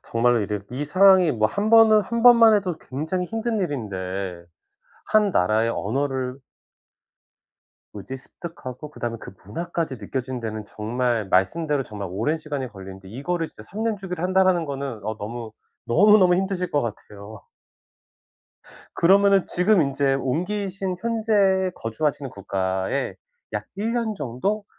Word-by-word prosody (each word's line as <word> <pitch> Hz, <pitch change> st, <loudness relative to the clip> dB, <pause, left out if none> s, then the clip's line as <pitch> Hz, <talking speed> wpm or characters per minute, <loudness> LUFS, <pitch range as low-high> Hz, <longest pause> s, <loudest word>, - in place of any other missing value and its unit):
정말로 120 Hz, 0 st, +2 dB
이래 105 Hz, 0 st, -2 dB
이 130 Hz, +4 st, -3 dB
상황이 185 Hz, +1 st, +5 dB
뭐 110 Hz, -2 st, +2 dB
1 205 Hz, -, -1 dB
번은 225 Hz, -1 st, +7 dB
1 235 Hz, +3 st, -3 dB
번만 230 Hz, -2 st, +8 dB
해도 185 Hz, -5 st, 0 dB
굉장히 160 Hz, +8 st, -3 dB
힘든 225 Hz, +1 st, -2 dB
일인데 95 Hz, -, -4 dB, 0.6 s
1 210 Hz, -2 st, +3 dB
나라의 110 Hz, -, +2 dB
언어를 130 Hz, +3 st, -2 dB, 1.5 s
뭐지? 105 Hz, +6 st, -7 dB
습득하고 145 Hz, -1 st, -9 dB
그다음에 120 Hz, -5 st, -4 dB
그 -, -, -10 dB
문화까지 165 Hz, -, -4 dB
느껴지는 130 Hz, +1 st, -4 dB
데는 110 Hz, -2 st, -5 dB
정말 115 Hz, 0 st, -2 dB
말씀대로 145 Hz, -, +1 dB
정말 105 Hz, -5 st, -7 dB
오랜 115 Hz, -, -1 dB
시간이 145 Hz, -4 st, -4 dB
걸리는데 95 Hz, -3 st, -11 dB
이거를 160 Hz, -, -3 dB
진짜 -, -, -14 dB
'3 210 Hz, -, -6 dB
년 225 Hz, -1 st, 0 dB
주기로 180 Hz, -4 st, -6 dB
한다.'라는 185 Hz, -2 st, +3 dB
거는 135 Hz, -7 st, -5 dB
어 110 Hz, 0 st, -3 dB
너무 115 Hz, +1 st, -6 dB, 0.3 s
너무, 205 Hz, -, +6 dB
너무 180 Hz, -2 st, +5 dB
힘드실 190 Hz, -1 st, -2 dB
것 145 Hz, -, +2 dB
같아요. 105 Hz, -2 st, -8 dB, 1.5 s
그러면은 195 Hz, +2 st, +4 dB
지금 185 Hz, +2 st, +3 dB
인제 140 Hz, -1 st, +1 dB
옮기신 185 Hz, +7 st, -2 dB
현재 210 Hz, -5 st, +2 dB
거주하시는 135 Hz, +4 st, -2 dB
국가에 95 Hz, +4 st, -2 dB, 0.4 s
약 -, -, -3 dB
1 220 Hz, +3 st, -1 dB
년 230 Hz, -3 st, -1 dB
정도 175 Hz, -, -2 dB
145 Hz, 295 characters per minute, -23 LUFS, 115-190 Hz, 1.5 s, 번만